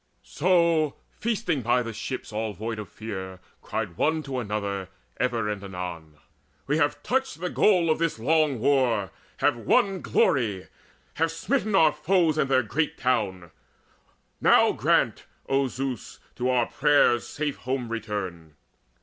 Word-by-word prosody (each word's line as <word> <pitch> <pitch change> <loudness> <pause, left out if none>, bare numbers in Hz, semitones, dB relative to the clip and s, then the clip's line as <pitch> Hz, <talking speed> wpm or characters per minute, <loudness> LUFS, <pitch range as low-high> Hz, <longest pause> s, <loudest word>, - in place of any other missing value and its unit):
So, 170 -3 +2 0.2
feasting 210 - -1
by 120 +2 +2
the 115 -1 -6
ships 130 +1 -6
all 110 0 -2
void 110 +3 -5
of 105 - -7
fear, 95 -4 -7 0.2
Cried 100 -6 -4
one 155 0 +1
to 135 -2 -3
another 100 -4 -3 0.3
ever 120 -4 0
and 105 -1 -3
anon: 90 -5 -7 0.5
"We 150 +2 +1
have 145 -2 0
touched 265 -8 -1
the 180 +1 -3
goal 180 -6 +3
of 155 - 0
this 165 -5 0
long 150 +3 +2
war, 125 -7 +2 0.3
have - - +4
won 185 - +1
Glory, 110 - +1 0.5
have 165 +1 +2
smitten 215 +6 -1
our 160 -4 +6
foes 155 0 +2
and 135 - +1
their 130 -1 +3
great 150 +8 -1
town! 95 -9 -1 0.9
Now - - +5
grant, - - +1 0.2
O 135 0 +2
Zeus, 130 -2 -5 0.2
to 125 +1 -1
our 125 -2 +3
prayers 140 -5 +3
safe 150 -2 -3
home 130 -2 -3
return!" 95 -8 -5
125 Hz, 145 wpm, -26 LUFS, 105-155 Hz, 0.9 s, our